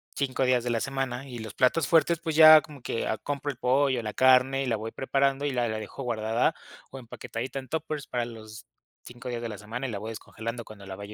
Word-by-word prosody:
5 135 -1 -1
días 125 -2 +2
de 120 - -2
la 115 -1 +1
semana, 135 -1 -3
y 120 -2 -7
los 110 -2 -7
platos 135 +5 +2
fuertes, 165 0 +3
pues, 160 -2 -3
ya 155 -1 +10
como 150 -5 -13
que 115 - -3 0.2
compro 145 0 -2
el 130 - -12
pollo, 130 0 +2
la 105 -1 -5
carne, 130 +1 +4
y - - -3
la 120 - +1
voy 110 +1 -5
preparando, 135 +1 0
y 145 - 0
la 120 -2 0
la 110 -1 -3
dejo 110 +5 -7
guardada 115 +4 0 0.4
o 135 - -8
empaquetadita 125 +2 -6
en 130 - -10
tuppers 155 -2 -4
para 120 -1 -2
los 110 -2 -10 0.4
5 120 +1 -9
días 120 -1 -3
de 115 - -4
la 105 - -7
semana 115 +6 -5
y - - -5
la 105 - -3
voy 110 +2 -6
descongelando 115 +2 -6
cuando 100 -2 -12
la 95 0 -7
vaya 100 +2 -9
125 Hz, 245 wpm, -27 LUFS, 115-135 Hz, 0.4 s, ya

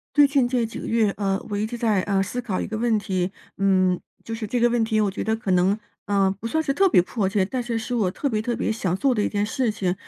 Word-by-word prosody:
最 290 -1 +7
近 275 -3 +2
这 245 -2 +1
几 225 - -7
个 - - -6
月， 225 -3 +2
呃， 195 -1 0
我 205 - -1
一 210 +1 0
直 240 +2 -5
在 220 -4 +2
呃， 195 -1 +1
思 225 +6 -3
考 215 -6 -3
一 - - -2
个 220 - -4
问 230 -1 +2
题。 185 -3 -1 0.3
嗯， 185 -2 +2 0.2
就 225 - -5
是 225 -1 -4
这 245 +4 -1
个 240 0 +4
问 240 -1 +1
题 220 -1 +1
我 205 -2 +2
觉 190 - -4
得 220 0 0
可 225 -3 -4
能 185 +3 +3 0.3
呃， 195 -2 +2
不 230 - -5
算 315 +6 +1
是 275 - +1
特 390 +7 +4
别 260 - +5
迫 195 +1 -1
切， 195 -1 +1
但 250 +6 -3
是 235 -1 -2
是 225 +3 -4
我 210 -6 +1
特 280 - -2
别 215 -5 0
特 240 +1 -2
别 - - 0
想 185 -5 -1
做 260 +5 +2
的 210 - +1
一 - - +1
件 205 -1 0
事 250 +1 0
情， 190 -4 -1
215 Hz, 315 characters per minute, -24 LUFS, 195-240 Hz, 0.3 s, 最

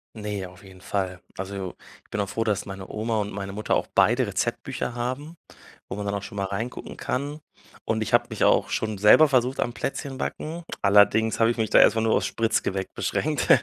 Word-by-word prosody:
Ne, 105 -3 -4
auf 90 +2 -15
jeden 95 -1 -14
Fall. 95 -2 -3 0.2
Also, 95 -1 -5 0.3
ich - - -31
bin 105 - -2
auch 100 - -4
froh, 115 - -1
dass 105 -3 0
meine 95 -1 -8
Oma 110 +1 -1
und 105 0 -3
meine 100 0 -5
Mutter 105 +2 -1
auch - - 0
beide - - +4
Rezeptbücher 120 - -2
haben, 130 +7 -4 0.5
wo - - -5
man 105 0 -4
dann 100 - -1
auch 100 - -3
schon 100 - -9
mal 100 - -1
reingucken 110 +6 -5
kann. 145 +4 -3 0.4
Und 110 0 0
ich 110 - -3
habe - - +5
mich - - -4
auch - - +4
schon 110 -1 -1
selber 105 +10 +7
versucht 130 -1 +2
am 120 - -1
Plätzchenbacken, 145 +5 -4 0.2
allerdings 105 +3 +4
habe 115 0 +5
ich 120 - -1
mich 110 -1 +1
da - - +6
erst - - +7
mal 110 - +2
nur 110 0 +2
aufs - - +2
Spritzgebäck 105 -4 -1
beschränkt, - - -1
105 Hz, 210 wpm, -25 LUFS, 100-120 Hz, 0.5 s, selber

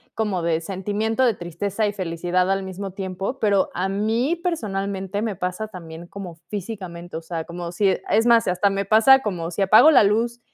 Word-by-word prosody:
como 205 -6 -1
de 165 -1 0
sentimiento 205 +7 -1
de 235 - +3
tristeza 195 +5 -3
y 205 - -2
felicidad 180 0 -1
al 195 0 0
mismo 190 +1 -6
tiempo. 195 +6 -4
Pero 200 -3 +2
a 185 +2 -1
mí, 225 - 0
personalmente, 200 - -3
me 215 -4 -2
pasa 180 +5 -3
también 170 -4 -10
como 180 -2 -8
físicamente, 180 -5 -6
o - - -6
sea, 165 -1 -5
como 170 0 -6
si 195 +2 +2
e 190 - -1
es 225 +3 +3
más, 230 -2 +6
si 180 - 0
hasta 200 +3 +2
me 195 0 -2
pasa 225 +6 +6
como 175 -5 -3
si 195 +3 -1
apago 215 +10 +7
la 270 -8 +6
luz, 230 +4 +1
195 Hz, 200 wpm, -23 LUFS, 180-215 Hz, -, apago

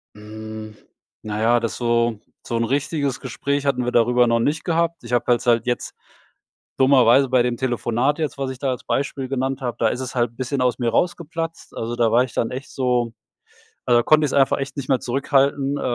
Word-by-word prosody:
Hm. 110 0 -9 0.5
Na 105 0 -4
ja, 120 +1 +4
das 115 -1 -3
so 115 -2 +1 0.3
so 115 - -2
'n 115 - +1
richtiges 140 +1 -1
Gespräch 140 +4 -2
hatten 125 -3 +1
wir 125 - -1
darüber 120 +1 +4
noch 115 0 +2
nicht 150 +6 0
gehabt. 170 -3 0
Ich 120 +1 -7
habe 120 -1 +2 0.2
halt 120 -1 +3
jetzt, 120 - -2 0.9
dummerweise 130 -1 +5
bei 125 -1 +3
dem 120 -1 -1
Telefonat 125 +3 0
jetzt, 155 -3 -3
was 135 -1 -2
ich 130 - -7
da 135 -1 -1
als 125 +1 -5
Beispiel 135 -1 -2
genannt 135 0 -2
habe. 120 -2 -3
Da 115 - +3
ist 125 - -3
es 130 -1 -5
halt 120 -2 +1
'n 120 - -27
bisschen 130 +1 -2
aus 125 0 +1
mir 120 -2 0
rausgeplatzt. 165 +4 -2
Also, 115 +1 -3
da 115 -2 +2
war 120 +3 +4
ich 125 - -9
dann 115 - 0
echt 130 +2 -7
so 125 -3 0 0.7
weil 120 - +3
da 120 - +4
konnte 155 +3 +4
ich 145 - +1
es - - -5
einfach 135 0 +3
echt 135 +1 -5
nicht 135 - -4
mehr 130 -3 +1
zurückhalten. 140 +2 +1
Äh, - - -5
125 Hz, 220 wpm, -22 LUFS, 120-140 Hz, 0.9 s, dummerweise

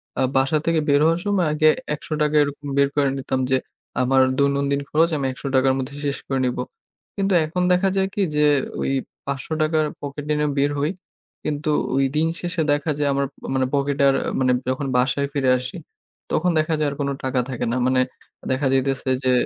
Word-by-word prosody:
এ্যাঁ 130 - +1
বাসা 135 +3 +2
থেকে 165 -1 +2
বের 145 0 +5
হওয়ার 165 +1 +3
সময় 200 -4 +2
আগে 155 +1 +4 0.3
৳১০০ 150 0 -1
এরকম 145 0 -5
বের 140 0 +5
করে 145 -2 +3
নিতাম 130 0 -2
যে, 130 - +5 0.4
আমার 130 +1 +4 0.2
দৈনন্দিন 140 0 +1
খরচ 165 +2 +3
আমি 140 - -2
৳১০০ 135 0 0
র - - +1
মধ্যে 135 +2 -5
শেষ 140 -2 -1
করে 135 -1 0
নিবো। 125 - -1 0.5
কিন্তু 195 -1 0
এখন 170 +4 -2
দেখা 185 +2 +2
যায় 190 0 +2
কি? 205 - -1
যে, 150 0 +4 0.4
ওই - - 0 0.3
৳৫০০ 155 +3 -1
র - - -1
পকেটে 145 +1 -3
নিয়ে 150 0 +1
বের 140 +1 +2
হই। 150 +3 +1 0.5
কিন্তু 150 0 -1 0.2
ওই 135 0 +3
দিন 155 +2 +2
শেষে 175 -1 -2
দেখা 145 +2 +1
যায়, 145 -1 +1
আমার 140 0 +1 0.3
মানে 130 -1 +2
পকেট 140 0 0
আর 135 - +4 0.2
মানে, 130 -1 +3 0.2
যখন 130 +2 -1
বাসায় 135 +3 +1
ফিরে 135 -3 +1
আসি, 125 0 -6 0.5
তখন 180 +3 +2
দেখা 155 +1 0
যায় 150 - +1
আর - - -6
কোন 140 -1 0
টাকা 130 -1 0
থাকে 130 - -3
না। 125 - 0
মানে 130 0 +3 0.5
দেখা 135 +2 +1
যাইতেছে 135 0 0
যে 130 - +3
140 Hz, 195 wpm, -22 LUFS, 135-155 Hz, 0.5 s, বের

